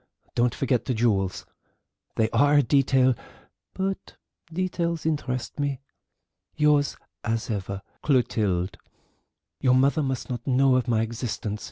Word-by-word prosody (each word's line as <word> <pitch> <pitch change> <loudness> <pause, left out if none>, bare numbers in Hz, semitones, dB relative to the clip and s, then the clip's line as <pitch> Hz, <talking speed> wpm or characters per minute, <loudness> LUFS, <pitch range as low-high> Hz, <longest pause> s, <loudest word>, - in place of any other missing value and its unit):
Don't 120 0 +2
forget 125 -4 0
the 130 - -1
jewels. 100 -5 +1 0.7
They 110 - +2
are 145 +1 +4
a 145 - +6
detail, 130 0 +4 0.6
but 195 0 -3 0.4
details 170 -2 -1
interest 140 -5 -2
me. 140 -2 -1 0.8
"Yours 150 -1 +3 0.3
as 115 0 -1
ever, 100 -1 -4 0.2
"CLOTILDE." 105 -9 +1 0.8
"Your 125 -1 +4
mother 140 +4 +3
must 135 -3 -2
not 120 0 -5
know 135 0 +4
of 130 0 +1
my 115 -2 +2
existence. 110 -2 -4
130 Hz, 125 wpm, -26 LUFS, 115-145 Hz, 0.8 s, a